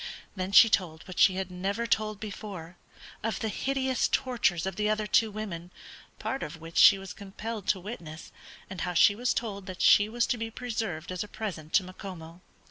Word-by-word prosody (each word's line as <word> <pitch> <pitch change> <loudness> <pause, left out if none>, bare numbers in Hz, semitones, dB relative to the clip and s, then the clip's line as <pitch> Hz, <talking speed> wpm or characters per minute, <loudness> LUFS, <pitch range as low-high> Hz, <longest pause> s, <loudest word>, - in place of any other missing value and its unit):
Then 185 0 -3
she 215 - +9
told, 175 -7 -1
what 185 - -6
she 190 - +6
had 190 -1 -3
never 195 +5 -2
told 215 -2 0
before, 200 -5 -7 0.5
of 225 0 -2
the 220 - -2
hideous 265 +3 0
tortures 240 -10 +1
of 190 -1 -3
the 210 +2 0
other 215 0 0
two 220 +1 +3
women, 195 -5 -6 0.5
part 265 - -3
of 160 +2 -6
which 165 +1 -3
she 195 - +9
was 195 -1 -8
compelled 210 +1 -7
to 190 - +2
witness, 170 -6 -8 0.4
and 190 -3 -7
how 180 -1 -2
she 205 - +6
was 245 +4 0
told 200 -5 -3
that 185 -1 -4
she 205 +1 +6
was 235 +1 +1
to 245 - -1
be 225 0 -3
preserved 220 -9 -4
as 185 +1 -2
a - - -9
present 195 -8 -6
to 195 - +5
Macomo. 180 -2 -9
200 Hz, 200 wpm, -28 LUFS, 180-220 Hz, 0.5 s, she